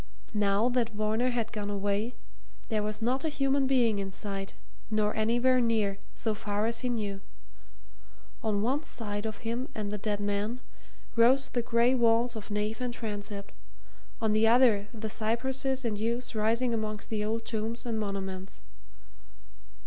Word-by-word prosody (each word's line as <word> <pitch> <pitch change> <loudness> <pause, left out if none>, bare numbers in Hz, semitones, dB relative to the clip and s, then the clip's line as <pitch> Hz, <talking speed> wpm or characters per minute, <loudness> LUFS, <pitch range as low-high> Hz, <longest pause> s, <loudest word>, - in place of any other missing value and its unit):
Now 205 +1 +3
that 245 -2 +1
Varner 215 +3 +1
had 235 -2 -1
gone 205 -1 -3
away, 205 +3 -1 0.5
there 215 -2 +1
was 215 +1 -3
not 255 +3 +1
a 320 - +1
human 275 -2 +2
being 240 -6 +3
in 195 -1 -3
sight, 195 0 -5 0.3
nor 215 -1 +1
anywhere 240 +4 +3
near, 215 -4 +1 0.2
so 220 - -1
far 205 0 -1
as 230 +1 0
he 250 - -1
knew. 205 -4 -2 1.2
On 210 -3 +1
one 265 +6 +1
side 210 -7 -3
of 220 +1 -7
him 235 +3 -1
and 210 -2 -3
the 210 - -3
dead 205 0 -1
man 205 +4 -1 0.6
rose 255 +4 +5
the 245 - 0
grey 235 +1 +3
walls 235 -1 +3
of 220 -1 -7
nave 210 +3 -1
and 245 -1 -2
transept; 205 -3 -5 0.7
on 220 -1 +2
the 220 +1 +4
other, 225 -4 +5
the 220 -2 -5
cypresses 260 +4 0
and 210 -3 -1
yews 235 +3 -1
rising 230 +3 +2
amongst 215 -1 -3
the 215 -1 0
old 225 +2 -1
tombs 225 +2 -2
and 225 -2 -1
monuments. 195 -2 -4
220 Hz, 160 wpm, -30 LUFS, 210-240 Hz, 1.2 s, rose